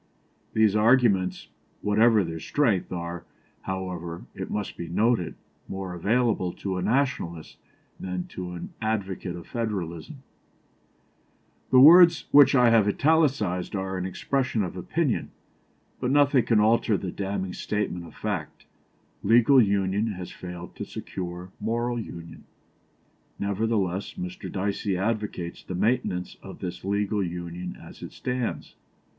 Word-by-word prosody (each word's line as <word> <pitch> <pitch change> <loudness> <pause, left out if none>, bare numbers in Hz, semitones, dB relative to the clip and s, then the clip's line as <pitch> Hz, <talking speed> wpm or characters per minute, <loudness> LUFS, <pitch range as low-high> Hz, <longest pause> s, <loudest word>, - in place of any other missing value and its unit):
_These 110 -2 +4
arguments, 105 -5 +3 0.3
whatever 110 +1 +4
their 80 -1 -5
strength, 110 - 0
are, 85 -1 -5 0.4
however, 90 -3 -5
it - - -6
must 105 -2 -3
be 85 - -6
noted, 110 +1 +1 0.3
more 95 -2 -5
available 105 0 +1
to 95 -2 -4
a - - -2
Nationalist 110 - -1 0.4
than 90 -1 -4
to 90 -1 -6
an 85 - -7
advocate 100 -5 -2
of 85 - -10
federalism_." 100 - -4 1.5
The 130 - +6
words 170 +4 +8
which 145 -1 +7
I 125 -2 +6
have 110 -3 +5
italicised 130 - +1
are 95 0 -3
an 90 0 -2
expression 125 +3 -1
of 90 - -5
opinion; 135 - -1 0.7
but 125 - -1
nothing 140 -3 +4
can 115 -3 +3
alter 110 0 +3
the 95 -2 -4
damning 95 -2 -3
statement 90 -5 -3
of - - -15
fact 90 -8 -4 0.6
"legal 120 +5 +6
union 100 +1 +1
has 90 -2 -7
failed 90 -1 -9
to - - -4
secure 90 0 -6
moral 120 +2 -1
union." 85 -6 -9 0.9
Nevertheless, 100 - -1
Mr. 185 -1 -6
Dicey 100 0 -1
advocates 105 -4 -3
the 90 - -6
maintenance 95 -3 0
of - - -10
this 90 0 -6
legal 100 +1 0
union 90 0 -5
as - - -13
it - - -8
stands. 125 -2 -3
100 Hz, 130 wpm, -26 LUFS, 90-115 Hz, 1.5 s, words